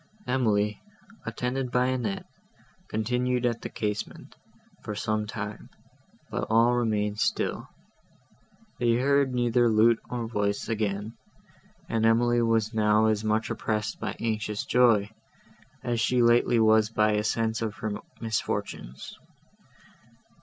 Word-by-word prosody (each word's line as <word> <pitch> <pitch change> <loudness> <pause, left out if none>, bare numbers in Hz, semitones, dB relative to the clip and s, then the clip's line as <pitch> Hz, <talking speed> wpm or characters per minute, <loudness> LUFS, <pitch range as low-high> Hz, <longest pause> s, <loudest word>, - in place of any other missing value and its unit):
Emily, 105 -5 +1 0.5
attended 125 +3 -2
by 125 0 +2
Annette, 125 -6 -2 0.6
continued 125 +3 0
at 120 -1 0
the - - -5
casement, 105 -1 -5 0.5
for 105 - -5
some 110 0 -1
time, 105 0 -6 0.6
but - - -2
all 115 +2 +4
remained 105 -3 0
still; - - -1 1.1
they 120 -1 +3
heard 140 +2 +2
neither 120 -1 +2
lute 110 +1 +4
nor 120 -2 -3
voice 100 -2 -1
again, 105 -1 -2 0.7
and 110 -1 -1
Emily 120 +1 +3
was 115 -1 +1
now 105 0 +3
as 110 -1 +1
much 110 +1 0
oppressed 105 -1 -2
by - - -4
anxious 105 -2 -2
joy, 115 -4 +3 0.7
as 120 -2 -1
she 125 +1 +2
lately 120 0 +4
was 110 -1 +4
by 110 -1 +2
a 105 0 +1
sense 110 +1 0
of 110 -2 -2
her 110 -2 -4 0.3
misfortunes. 110 - -4
110 Hz, 125 wpm, -27 LUFS, 105-120 Hz, 1.1 s, all